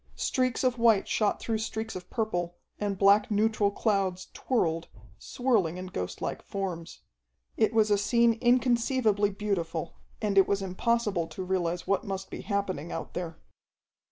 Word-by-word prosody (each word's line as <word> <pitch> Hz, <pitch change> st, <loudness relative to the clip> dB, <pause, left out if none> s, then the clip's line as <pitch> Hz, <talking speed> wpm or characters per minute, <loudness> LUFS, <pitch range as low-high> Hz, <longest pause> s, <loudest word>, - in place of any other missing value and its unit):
Streaks 255 Hz, -1 st, 0 dB
of 250 Hz, -2 st, +1 dB
white 225 Hz, -4 st, +4 dB
shot 210 Hz, -2 st, +1 dB
through 225 Hz, -1 st, -2 dB
streaks 220 Hz, 0 st, -4 dB
of 180 Hz, -1 st, -8 dB
purple 175 Hz, -7 st, -2 dB, 0.2 s
and 205 Hz, -2 st, -1 dB
black 200 Hz, +2 st, +5 dB
neutral 215 Hz, -1 st, +2 dB
clouds 195 Hz, -3 st, -1 dB
twirled, 165 Hz, -10 st, 0 dB, 0.3 s
swirling 215 Hz, -10 st, 0 dB
in 185 Hz, -, -5 dB
ghostlike 90 Hz, -, -4 dB
forms. 180 Hz, -4 st, -5 dB, 0.5 s
It -, -, +2 dB
was 220 Hz, -1 st, +3 dB
a 205 Hz, -, +4 dB
scene 235 Hz, +3 st, +3 dB
inconceivably 240 Hz, -4 st, +3 dB
beautiful, 190 Hz, -6 st, -3 dB, 0.3 s
and 205 Hz, -2 st, +3 dB
it 190 Hz, -, +5 dB
was 200 Hz, -1 st, 0 dB
impossible 195 Hz, -2 st, 0 dB
to 185 Hz, -, -6 dB
realize 180 Hz, -2 st, -1 dB
what 195 Hz, 0 st, +1 dB
must 195 Hz, -1 st, -5 dB
be -, -, -6 dB
happening 190 Hz, -6 st, -2 dB
out -, -, -5 dB
there. 170 Hz, -2 st, -5 dB
200 Hz, 150 wpm, -28 LUFS, 185-225 Hz, 0.5 s, black